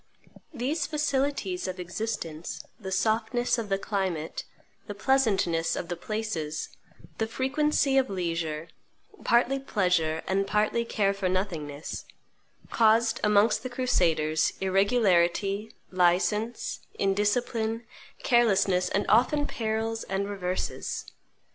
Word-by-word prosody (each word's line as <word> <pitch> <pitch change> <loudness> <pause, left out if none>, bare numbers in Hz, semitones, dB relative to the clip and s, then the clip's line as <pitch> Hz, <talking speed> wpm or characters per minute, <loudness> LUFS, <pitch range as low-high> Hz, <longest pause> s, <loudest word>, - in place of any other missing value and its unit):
These 285 +3 -1
facilities 280 - -1
of 185 0 -5
existence, 175 -3 -4 0.2
the 190 -3 -6
softness 225 +5 +1
of 220 -3 -4
the 195 - +2
climate, 190 -6 -3 0.4
the 205 - -5
pleasantness 195 -8 +2
of 170 - -5
the 175 - -2
places, 175 -6 -3 0.5
the 220 - +1
frequency 270 +2 +2
of 265 - 0
leisure, 165 -4 -3 0.5
partly 245 +3 +3
pleasure 180 -10 0
and 195 +1 0
partly 215 +3 +1
care 200 -3 +1
for 195 -2 -1
nothingness, 165 -6 -3 0.7
caused 225 +1 +3
amongst 210 +1 +4
the 255 - -5
crusaders 165 -11 +1
irregularity, 195 0 +2 0.2
license, 190 +6 +1 0.2
indiscipline, 220 +3 0 0.4
carelessness, 195 -6 +3
and 200 - 0
often 290 +5 +3
perils 225 -2 -2
and 195 +1 -2
reverses. 185 -2 -3
205 Hz, 105 wpm, -27 LUFS, 180-235 Hz, 0.7 s, amongst